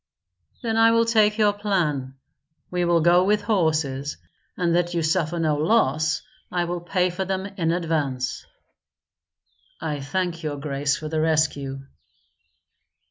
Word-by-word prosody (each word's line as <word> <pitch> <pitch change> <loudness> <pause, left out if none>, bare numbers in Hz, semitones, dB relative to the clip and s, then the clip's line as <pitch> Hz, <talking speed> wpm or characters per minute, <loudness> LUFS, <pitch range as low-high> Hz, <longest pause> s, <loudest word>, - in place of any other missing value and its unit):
"Then 225 -1 0
I 225 0 +6
will 230 0 +3
take 215 -2 +3
your 210 -2 +4
plan. 165 -11 -1 0.6
We 180 -1 0
will 170 -1 +3
go 175 +2 +5
with 205 +2 +2
horses, 155 -9 0 0.4
and 170 -1 +1
that 175 0 0
you 170 - 0
suffer 165 +1 0
no 155 -2 +1
loss 155 -3 +2 0.3
I 175 -1 0
will 175 0 -3
pay 180 +1 0
for 185 +2 -3
them 190 0 -2
in 190 -5 -2
advance." 155 -7 -1 1.4
"I 150 -2 -3
thank 170 +4 -2
your 150 -3 -3
grace 140 0 -1
for 155 - -6
the 155 0 -1
rescue." 150 -4 0
170 Hz, 140 wpm, -24 LUFS, 150-190 Hz, 1.4 s, I